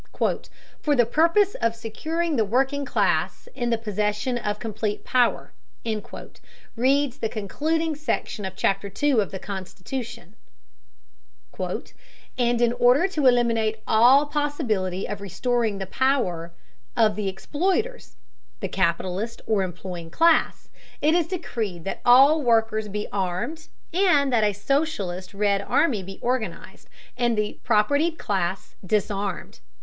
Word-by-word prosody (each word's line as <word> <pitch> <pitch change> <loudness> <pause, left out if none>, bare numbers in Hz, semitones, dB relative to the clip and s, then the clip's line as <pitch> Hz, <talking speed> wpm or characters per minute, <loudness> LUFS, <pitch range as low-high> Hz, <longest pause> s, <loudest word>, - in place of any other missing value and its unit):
"For 295 -1 +2
the 240 -3 +4
purpose 335 - +3
of 230 0 +1
securing 315 +9 -2
the 225 - +3
working 270 +6 0
class - - 0
in 240 -2 -2
the 230 - +2
possession 210 +2 -1
of 210 -3 -2
complete 215 -1 -3
power," 245 -2 +1 1.2
reads 270 +2 +2
the 225 - -1
concluding 310 +10 -1
section 290 -7 -3
of 190 0 -5
chapter 195 +1 0
two 265 +3 +2
of 200 - -3
the 190 - -6
constitution, 200 +3 -7 2.0
"and 240 -1 +1
in 240 0 +3
order 250 +10 +4
to 300 -7 +1
eliminate 230 -3 +2
all 250 +6 +6
possibility 255 - -1
of 205 -1 -5
restoring 220 +3 -1
the 195 - -4
power 190 -8 0 0.5
of 220 -3 +4
the 210 -2 -2
exploiters, 365 - -2 0.4
(the - - -2
capitalist 190 +5 -1
or 215 -3 +1
employing 180 -2 -6
class), 330 - +2 0.3
it 310 +2 +3
is 340 -2 +2
decreed 225 - -4
that 195 - -5
all 275 +6 +6
workers 225 -3 +2
be 210 +1 -4
armed, 195 - -3 0.3
and 300 -8 +3
that 225 -3 +3
a 210 - +3
socialist 205 - -2
Red 200 -1 +2
Army 220 +1 +1
be 195 +1 -9
organized 235 -7 -3 0.3
and 240 -2 +1
the 210 0 -2
propertied 285 +10 +2
class 190 -2 -2
disarmed." 200 - -2
230 Hz, 130 wpm, -24 LUFS, 200-280 Hz, 2.0 s, all